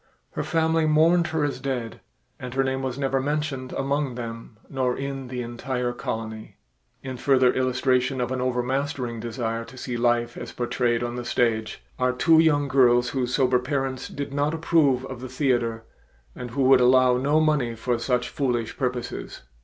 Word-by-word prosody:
Her - - -3
family 160 -1 +1
mourned 165 +3 +4
her 160 -2 -1
as 145 -1 -2
dead 125 -4 -4 0.4
and 125 0 -7
her 135 - +3
name 130 0 -1
was 130 -1 -3
never 135 -1 0
mentioned 145 -2 -2
among 140 -1 -1
them 115 -2 -7
nor 130 -2 -1
in 135 -1 -4
the 125 0 -4
entire 120 +1 -3
colony. 110 -3 -6 0.5
In 130 -1 -5
further 130 -1 +3
illustration 130 0 +1
of 125 0 -1
an 130 -1 -2
overmastering 130 0 -1
desire 115 0 -3
to 130 - -14
see 125 -1 -4
life 120 0 +1
as - - -7
portrayed 120 -1 0
on 120 0 -3
the 120 - -4
stage 110 - -1 0.2
are 125 0 +2
two 160 +5 +4
young 145 -3 +3
girls 125 -2 +4
whose 125 -1 -1
sober 130 -2 +3
parents 135 0 -2
did 140 -1 -6
not 145 +2 0
approve 150 -6 +2
of 130 -2 -8
the 130 - -6
theater 120 -5 0 0.5
and 125 - -6
would 130 0 +4
allow 125 0 +5
no 145 +4 +2
money 150 -7 +1
for 120 +1 -1
such 125 0 0
foolish 120 -5 -2
purposes. 125 -2 -4
130 Hz, 170 wpm, -25 LUFS, 120-140 Hz, 0.5 s, allow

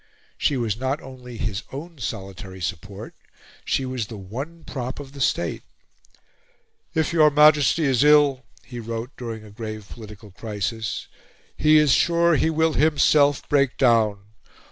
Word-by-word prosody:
She 140 - 0
was 115 -3 -2
not 130 +3 -1
only 125 -2 -11
his 105 -1 -3
own 155 +3 -8
solitary 95 -4 -6
support; 100 +4 -6 0.5
she 135 - -1
was 130 -4 -3
the 110 - -8
one 135 - -7
prop 130 -2 -5
of 140 -2 -9
the 140 -1 -9
State. 85 -8 0 1.3
"If 160 0 0
your 155 -2 +6
Majesty 150 +2 +5
is 135 -2 +3
ill," 145 -3 +5 0.2
he 120 +1 -8
wrote 115 +2 -5
during 115 -3 -7
a 105 - -13
grave 110 -1 -7
political 105 -2 -12
crisis, 105 +1 -4 0.5
"he 155 0 +4
is 150 -2 +4
sure 170 0 +3
he 160 - +2
will 160 0 +1
himself 145 -2 +3
break 140 -3 +2
down. 115 -5 +3
125 Hz, 145 wpm, -23 LUFS, 110-150 Hz, 1.3 s, your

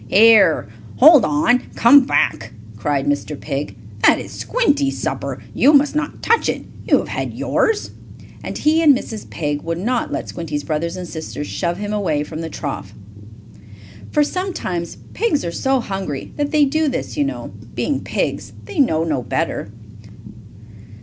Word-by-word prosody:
"Here! 205 - +5 0.3
Hold 300 -1 +8
on! 155 +12 +3 0.2
Come 270 +3 +7
back!" 110 - 0 0.2
cried 135 +5 -1
Mr. 145 0 -2
Pig. 145 -1 -4 0.3
"That - - +6
is - - -8
Squinty's 290 - 0
supper. - - -3
You 290 - +4
must 285 +1 +4
not 305 - -3
touch 460 - +2
it. - - -2 0.2
You - - +5
have - - -4
had - - -4
yours!" 440 -1 0 0.5
and - - -5
he 315 +2 +2
and 290 -5 +6
Mrs. 220 -4 -8
Pig 145 -2 -3
would 165 0 -3
not 235 +7 -1
let - - -3
Squinty's 150 -4 -4
brothers 165 +2 -2
and 180 -1 -6
sisters 160 -2 -6
shove 170 +3 -2
him 205 +1 -4
away 165 -8 0
from 155 +1 -7
the 165 - -5
trough. 135 -10 -6 1.1
For 300 - +3
sometimes 290 - -3 0.2
pigs 335 - 0
are 170 - -2
so 265 +8 +1
hungry 195 - -5
that 290 -1 -1
they 300 -1 +4
do 310 +3 0
this, 255 -2 -3
you 295 - +1
know. 285 - -4 0.2
Being - - -1
pigs - - -3
they 395 - -6
know 165 - +3
no 150 -6 -1
better. 110 - -2
200 Hz, 165 wpm, -19 LUFS, -, 1.1 s, Hold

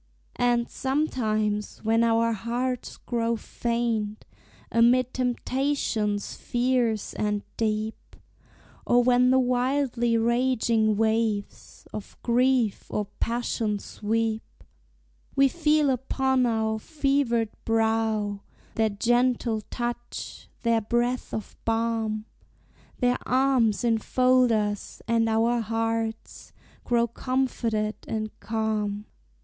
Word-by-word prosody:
And 240 -1 +2
sometimes, 215 -7 -1
when 225 +1 +3
our 230 0 +3
hearts 240 +4 -3
grow 235 -1 -1
faint 230 -2 -2 0.5
Amid 245 +2 +4
temptations 250 -4 -1
fierce 240 -3 0
and 210 -1 -1
deep, 215 0 -2 0.7
Or 245 0 +4
when 250 0 +4
the 260 - +5
wildly 250 -1 +1
raging 230 -2 +2
waves 220 -2 -1
Of 210 - -8
grief 245 -2 +2
or 210 -1 -2
passion 230 -2 -1
sweep, 220 +2 -2 0.9
We 275 0 +5
feel 300 -1 +2
upon 265 0 +1
our 220 -1 0
fevered 275 -5 0
brow 220 -2 0 0.3
Their 220 -1 +2
gentle 235 +1 +1
touch, 240 0 -5
their 230 -1 +3
breath 240 +3 -1
of 215 - -5
balm; 225 -1 -1 0.7
Their 245 -1 +1
arms 255 -4 +2
enfold 250 +2 +3
us, 210 -2 -2
and 230 -1 +2
our 230 +2 +2
hearts 225 0 -3 0.3
Grow 235 -1 +3
comforted 235 -3 -1
and 215 -1 -3
calm. 215 -1 -2
230 Hz, 95 wpm, -26 LUFS, 220-250 Hz, 0.9 s, the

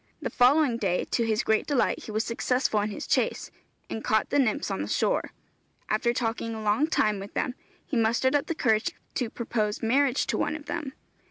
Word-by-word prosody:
The - - -4
following 255 0 +4
day, 190 -5 0
to 230 -2 +1
his 215 -1 +1
great 220 0 +1
delight, 285 -4 +1
he - - -7
was 215 +1 0
successful 240 -1 0
in 210 - -1
his 205 - -6
chase, - - 0 0.4
and 220 - -5
caught 220 0 +1
the 285 - +3
nymphs 245 -6 +1
on 95 - -2
the 100 - -3
shore. - - 0 0.6
After 225 +3 +2
talking 230 -1 -2
a 220 - -6
long 215 +9 +2
time 215 -10 +1
with 195 +1 -9
them, 250 - -1 0.3
he - - -4
mustered 235 +4 +2
up 290 - +1
the 330 - -2
courage 220 -6 +1 0.2
to 245 -3 -1
propose 220 -3 -2
marriage 265 +3 +2
to - - -1
one - - 0
of 305 -1 -8
them. 300 -6 -4
230 Hz, 205 wpm, -27 LUFS, 215-260 Hz, 0.6 s, following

